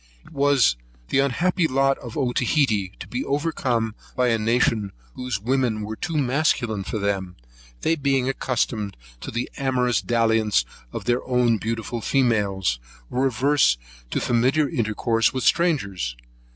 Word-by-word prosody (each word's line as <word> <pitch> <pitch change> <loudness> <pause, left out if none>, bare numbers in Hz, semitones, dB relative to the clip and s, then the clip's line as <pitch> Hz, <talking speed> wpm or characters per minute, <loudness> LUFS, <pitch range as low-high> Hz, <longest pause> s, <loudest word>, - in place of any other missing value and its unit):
It - - -16
was 140 - +3 0.3
the - - +2
unhappy 165 +6 +2
lot 135 0 +2
of 120 -2 -8
Otaheite 125 - +1
to - - -7
be 125 - -3
overcome 135 -6 -1 0.2
by 125 -1 +2
a 115 -1 +2
nation 110 -2 +1 0.2
whose 125 -5 -3
women 120 -1 0
were 110 +1 -5
too 165 +7 -3
masculine 125 -6 +1
for 110 - -4
them; 100 -3 -2 0.5
they 165 - +2
being 135 -3 +1
accustomed 115 - -1 0.2
to - - -7
the 120 +2 -2
amorous 125 -3 +1
dalliance 110 -2 +2 0.3
of - - -6
their 120 +1 +1
own 125 -3 +2
beautiful 115 +1 -3
females, 100 - +1 0.3
were 130 +2 +2
averse 130 - +3 0.3
to - - -1
familiar 130 +6 +2
intercourse 115 -4 +1
with 130 - -1
strangers. 100 - +1
120 Hz, 140 wpm, -23 LUFS, 110-135 Hz, 0.5 s, was